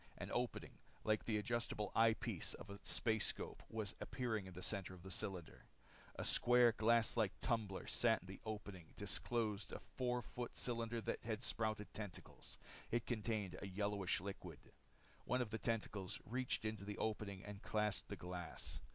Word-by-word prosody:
An - - -4
opening, - - -1 0.2
like 110 -1 +3
the 110 -2 +2
adjustable 105 -1 0
eye 115 -1 +7
piece - - -1
of 100 - -8
a 100 - -6
spacescope, 110 -1 +1
was 110 -3 -1
appearing 110 -6 -1
in 95 - -8
the 90 - -5
center 95 -3 0
of 85 - -13
the 95 - -6
cylinder. 90 -3 -3 0.5
A - - -2
square, 120 -1 +7
glass 115 +1 +5
like 110 -4 +2
tumbler 110 -6 0
sat 115 -6 +4
in - - -12
the 95 - -8
opening 100 -6 -5
disclosed 105 +1 0
in - - -4
the - - -14
four 125 -1 +1
foot 120 -1 -5
cylinder 115 -1 0
that - - -2
had 110 +1 -2
sprouted 110 -3 0
tentacles. 105 -5 -6 0.3
It 120 0 +1
contained 110 -5 -1
a 100 - -3
yellowish 100 -1 +1
liquid. 100 +2 -5 0.7
One 125 - +2
of 120 -4 0
the 110 - -1
tentacles 105 -3 -1
reached 125 -1 0
into 110 -2 -1
the 105 0 -4
opening 105 -3 -1
and 105 -1 -6
clasped 105 -1 +1
the 100 - -2
glass. 90 -1 -3
110 Hz, 170 wpm, -42 LUFS, 100-115 Hz, 0.7 s, eye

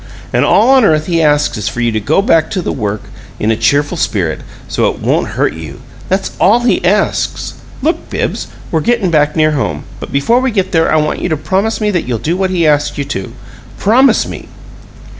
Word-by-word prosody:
And - - +3
all 235 +5 +4
on 265 -2 +5
earth 155 -6 +3
he 170 -1 +1
asks 150 -6 +2
is 105 +1 -2
for 115 - -6
you 120 -1 +1
to 110 - -1
go 150 - +1
back 165 -5 +2
to 185 - -3
the - - -2
work 105 -3 -3 0.4
in 110 - +1
a - - +2
cheerful 145 +9 +1
spirit, 85 - -1 0.3
so - - +1
it - - -5
won't - - -1
hurt - - +1
you! 80 -3 -9 0.3
That's 190 +1 -1
all 220 +6 +4
he 240 - +1
asks. - - 0 0.3
Look, 325 +4 -1
Bibbs, - - -3 0.2
we're 160 - +1
gettin' 225 -3 +1
back 150 -1 +2
near 155 -1 +3
home, 145 -3 -2 0.2
but - - -8
before 185 - +2
we 260 +1 0
get 190 -5 -1
there 165 -3 +2
I - - +3
want 150 -1 0
you - - -1
to 155 - 0
promise 190 +9 -1
me 210 -1 0
that 175 -8 -2
you'll 120 -2 -1
do 160 +10 -2
what 190 0 0
he 175 -3 +1
asks 150 0 +1
you 140 - -1
to. 95 - -5 0.5
Promise 255 +6 +3
me!" - - -8
160 Hz, 220 wpm, -14 LUFS, 140-195 Hz, 0.5 s, on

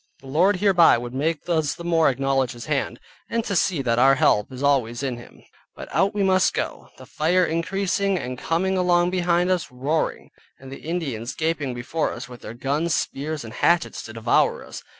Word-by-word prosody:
The - - -16
Lord 170 +9 +3
hereby 180 -7 +5
would 120 +1 -6
make 150 +3 -2
us 160 -4 0
the 170 - -9
more 165 -3 +3
acknowledge 135 -1 0
His 120 -1 -9
hand, 145 -3 -2 0.3
and 230 -1 -1
to 200 - -2
see 175 -5 +1
that 115 -1 +1
our 135 +2 +6
help 105 -4 +2
is 130 +1 -7
always 130 -3 +1
in 130 -3 -2
Him. 120 - -14 0.3
But - - -9
out 200 +2 +1
we 205 - +1
must 190 -1 +3
go, - - -4
the - - -12
fire 175 +4 +1
increasing, 195 +4 0
and 125 -6 -4
coming 185 +7 0
along 175 -1 +3
behind 175 0 +1
us, 180 -7 -1
roaring, 140 +6 -2 0.3
and 135 0 -12
the 135 - -9
Indians 140 -9 -4
gaping 155 -5 -2
before 135 +7 -2
us - - -7
with 125 -2 -12
their 115 - -8
guns, 145 +6 0
spears, 150 +1 -3
and 110 -1 -9
hatchets 170 -1 +1
to 110 - -9
devour 115 +1 +1
us. - - -9
155 Hz, 200 wpm, -23 LUFS, 130-175 Hz, 0.3 s, our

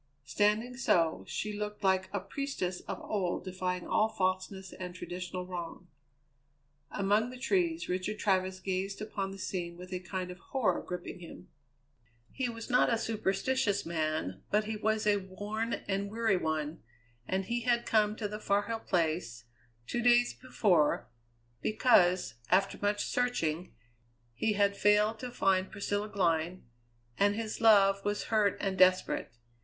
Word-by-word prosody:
Standing 210 - +1
so, 165 -10 +2
she 210 0 -3
looked 210 0 -5
like 190 -1 +2
a 200 - -1
priestess 195 -3 -3
of - - -4
old 185 -3 -2
defying 180 -1 -3
all 215 - +2
falseness 190 -2 -2
and 180 -1 -7
traditional 180 0 -5
wrong. 180 -1 -7 1.0
Among 205 +4 +1
the 255 - -9
trees 335 +4 0
Richard 185 +4 -2
Travers 190 -2 +1
gazed 190 +1 -2
upon 205 -2 -3
the 195 - -8
scene 175 -3 -4
with 180 +1 -9
a 180 - -2
kind 185 0 -4
of 180 - -11
horror 215 -5 0
gripping 180 0 -6
him. 170 - -11 0.8
He 255 -2 -2
was 230 -1 -7
not 250 -1 +4
a 230 - +3
superstitious 215 0 0
man, 155 - -2
but 210 +1 +2
he 220 +1 -3
was 215 0 0
a 205 -1 +4
worn 205 +4 -4
and 200 0 -1
weary 220 -1 +1
one, 155 -2 -2 0.5
and 190 0 -1
he 235 +3 -1
had 235 0 +1
come 210 -1 +2
to 215 -1 -3
the 210 +1 -6
Far 205 -1 +1
Hill 230 0 -3
Place, 160 - -1 0.4
two 240 - -2
days 240 0 +4
before, 185 -11 +1 0.5
because, 185 - +3 0.2
after 195 +1 +2
much 205 0 +1
searching, 180 -9 -1 0.6
he 210 - 0
had 200 -1 +2
failed 210 +2 +3
to 250 - -5
find 190 -5 +1
Priscilla 205 +1 -2
Glynn, 175 -2 0 0.6
and 205 +1 +4
his 220 0 -4
love 195 -3 +6
was 205 0 -1
hurt 210 -3 +3
and 195 -2 -2
desperate. 185 -8 +3
200 Hz, 150 wpm, -31 LUFS, 185-215 Hz, 1.0 s, love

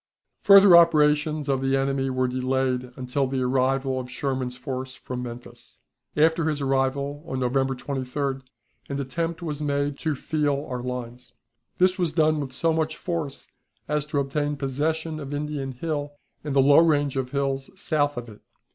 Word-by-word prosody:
Further 200 -3 +8
operations 150 -2 +4
of 135 -2 +1
the 135 0 +2
enemy 135 0 0
were 130 0 0
delayed 130 0 -1
until 130 +1 -1
the 130 0 -1
arrival 130 +1 +1
of 125 -1 -7
Sherman's 130 -2 -3
force 130 +1 -5
from 125 -1 -6
Memphis. 120 0 -10 0.4
After 160 +1 +3
his 150 -2 -2
arrival, 140 +1 -1
on 130 - -3
November 135 +1 +1
23d, 135 +1 -3 0.5
an 140 0 -3
attempt 165 +5 -3
was 150 -3 -4
made 145 -1 -1
to 155 -2 -1
feel 145 -1 -1
our 125 -2 -4
lines. 125 0 -6 0.4
This 185 +1 +3
was 170 -3 +1
done 155 -1 +3
with 140 -2 -4
so 165 +5 +1
much 160 -1 -1
force 165 -6 -4 0.4
as 150 0 -1
to 150 - -2
obtain 145 +1 -1
possession 155 +4 -2
of 145 0 -5
Indian 145 -2 -3
Hill 145 +1 -3 0.3
and 145 -2 -3
the 135 - +5
low 140 +2 +7
range 145 -4 +3
of 130 -1 -2
hills 135 0 -2
south 145 -7 0
of 120 0 -5
it. 105 -2 -13
140 Hz, 165 wpm, -25 LUFS, 130-150 Hz, 0.5 s, Further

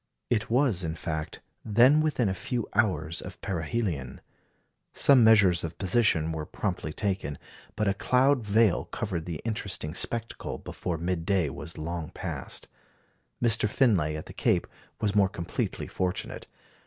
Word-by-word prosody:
It 110 -2 +1
was, 120 -7 +2
in 80 -1 -2
fact, 80 -2 -4 0.2
then 120 +8 +5
within 145 -7 +1
a 95 - 0
few 120 +5 -3
hours 85 -7 +1
of 90 -1 -9
perihelion. 85 - -2 0.7
Some 135 -4 +5
measures 105 -6 +6
of 85 -1 -5
position 95 -5 +2
were 80 -1 -4
promptly 90 -6 -3
taken; 95 -5 -2 0.4
but 105 - 0
a 100 - +3
cloud 130 +5 +3
veil 105 -1 +3
covered 90 -6 -4
the 85 -4 -4
interesting 100 -8 -2
spectacle 115 +5 -2
before 85 -2 -4
mid 85 +1 -2
day 90 -6 +1
was 80 +6 -8
long 80 0 -4
past. - - -6 0.8
Mr. 115 -2 +3
Finlay 95 - +2
at 80 - -7
the - - -10
Cape - - +1 0.3
was 105 -2 0
more 100 -2 +4
completely 85 -2 -3
fortunate. 90 -1 -3
95 Hz, 145 wpm, -28 LUFS, 80-110 Hz, 0.8 s, measures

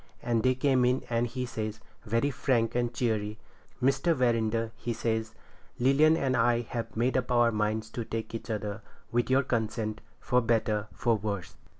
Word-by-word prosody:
And 115 -2 +1
they 130 +2 +3
came 130 -1 +3
in 125 +1 +2
and 115 +1 +1
he 125 +1 -3
says, 110 -2 -4 0.3
very 115 +6 +1
frank 120 -4 +1
and 120 -1 0
cheery— 110 -3 -1 0.5
'Mr. 135 +5 +3
Verinder,' 115 -3 +1
he 120 - -3
says, 110 -1 -2 0.4
'Lilian 145 +5 +4
and 135 -4 +1
I 120 0 +3
have 115 -1 -5
made 120 +3 +1
up 130 -1 0
our 120 -1 +4
minds 110 +1 -1
to 120 - -3
take 110 0 -5
each 115 - -6
other, 105 -1 -3 0.3
with 120 +1 +1
your 135 +2 +4
consent, 110 -2 -2 0.2
for 125 +1 +2
better, 110 -2 +1
for 120 -1 +1
worse.' 100 -5 -4
115 Hz, 175 wpm, -29 LUFS, 110-125 Hz, 0.5 s, Lilian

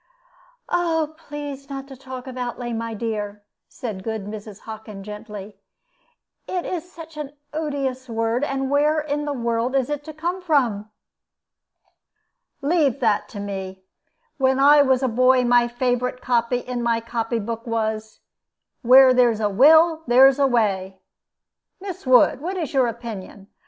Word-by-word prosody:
"Oh, 325 -3 0
please 290 -3 -8
not 275 0 -6
to 270 - -9
talk 260 -1 -9
of 260 -1 -8
outlay, 245 -1 -4
my 230 0 -4
dear," 210 -2 -4 0.3
said 210 -6 -6
good 220 -2 -4
Mrs. 210 -1 -9
Hockin, 215 -2 -9
gently; 210 -1 -9 0.9
"it 360 -2 -3
is 360 0 -5
such 325 -2 -11
an 290 -2 -6 0.2
odious 275 -4 -3
word; 230 +3 -1
and 270 -1 -2
where 300 +2 +3
in 295 -1 -2
the 295 - -2
world 235 0 -1
is 270 +1 +1
it 295 -1 -3
to 315 - -7
come 350 +4 -3
from?" 245 - +1 1.7
"Leave 285 -4 +2
that 220 -5 +1
to 205 - -8
me. 190 -2 -6 0.5
When 265 -1 +2
I 290 +1 +7
was 265 -1 +2
a - - +3
boy 255 +2 +3
my 240 0 +4
favorite 250 +1 -1
copy 240 0 +1
in 245 0 -4
my 235 -1 +1
copy 230 0 -3
book 230 +2 -5
was, 220 -1 -3 0.6
'Where 260 +1 +7
there's 240 -3 +3
a 210 -1 0
will 315 - +6
there's 265 +3 +6
a 275 - +4
way.' 195 -6 0 0.8
Miss 375 -7 -8
Wood, 255 +1 +5
what 370 +4 -3
is 320 -6 -4
your 260 -3 +3
opinion? 220 -4 -8
250 Hz, 150 wpm, -22 LUFS, 225-285 Hz, 1.7 s, I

